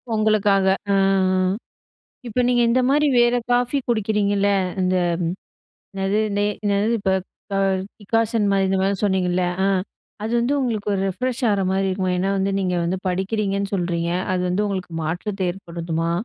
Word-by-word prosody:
உங்களுக்காக, 210 -2 +3 0.3
அ, - - +3
அ. 190 -1 +2 0.7
இப்ப 235 +2 -1
நீங்க 245 -1 +3
இந்த 255 +2 +3
மாரி 295 +2 +3
வேற 240 +1 +4 0.2
காஃபி 245 +3 +2
குடிக்கிறீங்கல்ல. 205 -3 +1 0.3
இந்த 185 0 +1 1.0
என்னது, 195 +2 0 0.2
டே 205 - +2 0.2
என்னது? 205 +1 +2
இப்ப 190 -1 0 0.4
ப 195 - -1 0.4
டிக்காஷன் 225 +1 0
மாரி, 195 -1 +2
இந்த 190 - +1
மாரி 195 +1 +1
சொன்னீங்கல்ல. 185 -2 +1 0.2
அ, - - +3 0.6
அது 220 - -3
வந்து 240 +4 +1
உங்களுக்கு 220 -5 -2
ஒரு 190 - 0
ரெஃப்ரெஷ்ஷா 250 +4 -1
ஆறமாரி 195 0 0
இருக்குமா? 185 -1 -1
ஏன்னா 190 +2 0
வந்து 195 +1 0
நீங்க 185 -2 0
வந்து 175 +3 -1
படிக்கிறீங்கன்னு 195 +1 -1
சொல்றீங்க. 170 -2 -1 0.2
அது 180 - 0
வந்து 190 +4 0
உங்களுக்கு 185 -3 -4
மாற்றத்தை 185 +5 -3
ஏற்படுதுமா? 170 -2 -3
195 Hz, 150 wpm, -22 LUFS, 185-215 Hz, 1.0 s, வேற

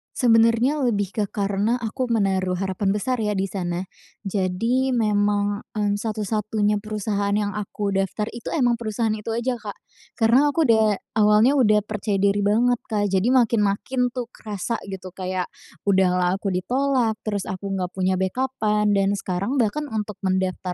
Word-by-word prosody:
Sebenarnya 230 +4 +3
lebih 205 -4 0
ke 210 - -1
karena 205 +3 0
aku 245 +2 -3
menaruh 190 -4 +1
harapan 195 +1 -1
besar 250 +3 -1
ya 210 -1 0
di 190 - +1
sana. 175 -2 -3 0.4
Jadi 205 +7 0
memang, 205 -2 +1
eee, 205 -1 +1
satu-satunya 210 -1 -1
perusahaan 205 -1 -2
yang 205 -1 0
aku 205 -1 -3
daftar 195 +2 -1
itu 235 -1 -9
emang 240 -5 +2
perusahaan 220 0 -1
itu 215 +1 -6
aja. 240 0 -1
Kak. 205 -2 -7 0.4
Karena 245 +6 +4
aku 320 +3 +1
udah 220 -3 +3 0.2
awalnya 210 +6 +5
udah 210 -4 +4
percaya 210 -1 -2
diri 200 +1 +2
banget, 230 +4 +2
Kak, 205 -2 0
jadi 190 +5 +2
makin-makin 240 +1 +2
tuh 250 - -2
kerasa 210 +2 -4
gitu 190 -1 -7
kayak 185 -1 -3 0.4
udah 190 -2 +4
lah 180 0 +2
aku 200 - -2
di 185 - 0
tolak, 255 -4 +1
terus 205 -3 -1
aku 195 +2 -5
nggak 180 -2 -2
punya 185 0 +1
backup-an 210 0 0
dan 195 0 +2
sekarang 200 +6 -2
bahkan 295 +8 -1
untuk 210 -2 -3
mendaftar 185 -1 -1
210 Hz, 160 wpm, -23 LUFS, 195-230 Hz, 0.4 s, awalnya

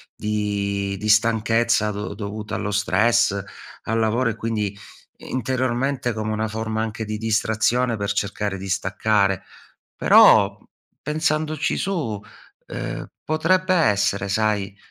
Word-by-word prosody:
di 100 -2 -2
di 105 - -3
stanchezza 115 0 +3
do 105 +1 -5
dovuta 105 0 -5
allo 105 - -3
stress, 105 +1 +2 0.4
al 115 +1 -1
lavoro 115 +2 +1
e - - -7
quindi, 105 -3 -3 0.4
interiormente, 130 0 -1
come 110 0 -3
una 110 +1 -1
forma 110 +1 -3
anche 110 0 -3
di 105 0 -4
distrazione, 110 +2 +1
per 100 -1 -2
cercare 100 -1 -2
di 95 +1 -7
staccare. 100 0 +1 0.5
Però - - +6
p - - -26 0.4
pensandoci 155 0 -1
su, 150 - -2 0.5
ehm, - - -5 0.2
potrebbe 185 +4 +2
essere, 100 - +2
sai. 105 -1 0
110 Hz, 120 wpm, -22 LUFS, 105-120 Hz, 0.5 s, Però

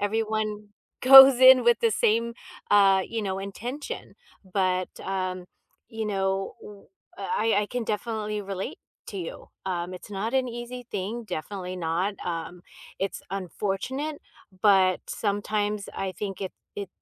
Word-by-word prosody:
Everyone 215 0 -1 0.3
goes 270 0 +10
in 255 -1 +8
with 240 0 +5
the 230 - +3
same, 230 +2 +1 0.4
uh, 195 -2 +5
you 225 -1 -3
know, 190 -1 -2
intention. 235 +9 -6 0.3
But, 185 -1 0
um, 185 -1 -3 0.4
you 225 -1 -4
know, 195 -1 -1 0.6
uh, - - -4
I 225 - +2
I - - -3
can 245 +1 -3
definitely 215 -1 -3
relate 195 -1 -5 0.3
to 200 - -6
you. 170 -3 -7 0.2
Um, 180 -1 -2
it's 180 - -11
not 205 +4 -3
an 260 -1 +2
easy 240 +1 -7
thing, 210 +4 -4
definitely 185 0 -5
not. 175 +4 -1
Um, 175 +1 -5 0.4
it's 195 0 -3
unfortunate 205 - -3 0.4
but 190 -3 +5
sometimes 205 0 -1
I 190 -1 -3
think 195 -1 -5
it 190 - -4 0.2
it 200 -2 -4
205 Hz, 140 wpm, -26 LUFS, 190-225 Hz, 0.6 s, goes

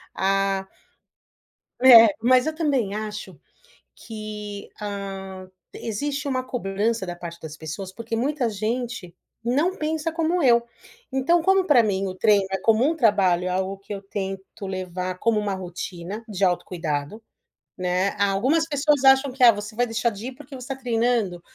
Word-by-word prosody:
a 195 0 0 1.1
É. 240 -3 +9
Mas 255 +3 +4
eu 315 - -1
também 275 - 0
acho 210 -6 -6 0.6
que, 210 -2 -8
hã, 195 -2 -6 0.2
existe 280 +6 -3
uma 255 -1 -1
cobrança 220 -3 -2
da 175 0 -5
parte 170 -1 -8
das 160 -1 -8
pessoas, 165 +5 -7
porque 230 +2 -5
muita 265 0 0
gente 220 -3 -4 0.3
não 295 +11 +1
pensa 315 0 -2
como 330 +1 0
eu. 235 -2 +5 0.5
Então, 300 +6 +2
como 385 +1 +3
pra 290 -9 +5
mim 195 -2 0
o 185 - -4
treino 200 0 +3
é 195 - -1
como 225 +5 +3
um 330 - -1
trabalho, 190 - +2
algo 190 +1 -2
que 200 +1 -7
eu 195 - -7
tento 195 0 -6
levar 185 -1 -4
como 230 0 +2
uma 205 -2 -1
rotina 185 +2 -6
de 200 -2 -1
autocuidado, 175 0 -2 0.6
né. 180 +2 +1
A 200 0 +3
algumas 280 +11 +1
pessoas 290 -2 +1
acham 270 0 +5
que: 255 0 -1
"Ah 240 - +10
você 210 0 -7
vai 245 +2 +2
deixar 225 +1 0
de 210 +4 -7
ir 260 - -7
porque 280 0 -11
você 255 -1 -9
tá 270 - -3
treinando?". 230 -7 0
215 Hz, 160 wpm, -24 LUFS, 190-255 Hz, 1.1 s, Ah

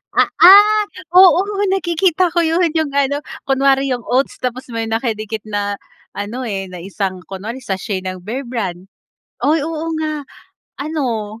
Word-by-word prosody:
Ah, - - +3
ah, 415 +4 +8 0.3
oo 370 -1 +7 0.3
nakikita 350 -1 +1
ko 345 - -2
'yon 335 +1 +2
yung 300 -3 -2
ano 280 0 +1 0.2
kunwari 270 0 +2
yung 245 -2 -3
oats 260 +2 0
tapos 250 0 -4
may 230 -1 -3
nakadikit 220 -2 -3
na, 205 -1 -3 0.4
an,o 230 +5 -5
eh, 195 -3 -4
na 180 - -8
isang 190 +1 -4
kunwari 205 +6 -6
sa 225 -7 -3
sachet 190 -1 -4
ng 185 -1 -5
Bearbrand. 220 -5 -4 0.6
Ay 310 +2 +3
oo 325 0 -4
nga. 310 -1 -3 0.5
Ano 240 -8 -3
255 Hz, 145 wpm, -18 LUFS, 205-315 Hz, 0.6 s, ah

